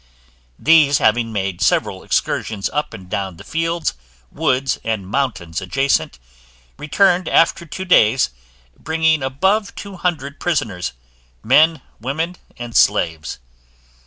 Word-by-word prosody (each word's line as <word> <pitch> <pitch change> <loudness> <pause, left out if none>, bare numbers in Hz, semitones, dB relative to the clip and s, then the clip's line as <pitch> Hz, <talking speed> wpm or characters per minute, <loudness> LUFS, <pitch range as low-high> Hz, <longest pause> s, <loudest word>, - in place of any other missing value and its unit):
These 150 -3 +5
having 115 +1 +2
made 95 -4 -3
several - - +1
excursions 105 -3 -1
up 150 - -1
and 95 -4 -10
down 95 -1 -4
the - - -11
fields, 165 +1 -1 0.4
woods, 135 -4 0
and 110 -4 -3
mountains 95 -8 -2
adjacent, 95 - 0 0.6
returned 180 +4 +2
after 165 0 +2
two 190 +5 -6
days, 125 - +4 0.4
bringing 160 -1 +1
above 190 +11 0
two 200 -2 -8
hundred 150 -6 -3
prisoners, 105 - -2 0.5
men, 155 +4 +4 0.2
women, 160 +9 -3 0.2
and 120 -1 -7
slaves. 80 -9 +2
135 Hz, 115 wpm, -19 LUFS, 105-165 Hz, 0.6 s, These